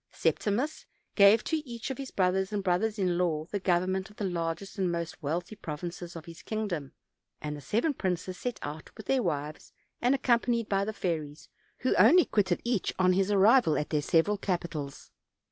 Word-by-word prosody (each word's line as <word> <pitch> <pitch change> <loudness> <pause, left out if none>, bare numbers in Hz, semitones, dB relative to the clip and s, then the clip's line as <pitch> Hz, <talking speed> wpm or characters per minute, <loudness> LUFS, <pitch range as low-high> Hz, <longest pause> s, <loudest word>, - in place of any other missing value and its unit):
Septi 210 - 0
mus 270 +10 -2 0.3
gave 200 +2 +6
to 320 - 0
each 250 -4 -6
of 265 - -6
his 270 -1 -5
brothers 190 +1 +1
and 205 -2 -2
brothers 200 +4 +1
in 180 -3 +1
law 160 -4 0
the 205 - -1
government 185 +2 0
of 210 - -17
the 210 - -5
largest 170 +2 -3
and 185 -2 +1
most 170 -1 -4
wealthy 170 +7 -3
provinces 170 0 -6
of 165 -1 -8
his 165 -1 -11
kingdom; 185 - -3 0.5
and 150 0 -4
the 145 - -9
seven 230 - 0
princes 185 -4 -2
set 245 +4 -4
out 150 +2 -6
with 215 - -9
their 265 +3 +2
wives, 150 -5 -3 0.3
and 250 +3 +3
accompanied 235 -3 +1
by 195 -1 +1
the 215 - -2
fairies, 160 -7 -4 0.3
who 255 - +2
only 290 - +7
quitted 190 -4 +1
each 235 -5 0
on 185 0 +4
his 195 +1 +1
arrival 205 - +5
at 150 - -3
their 150 -2 +2
several 180 +7 +2
capitals. 170 -7 -4
190 Hz, 190 wpm, -29 LUFS, 170-215 Hz, 0.5 s, only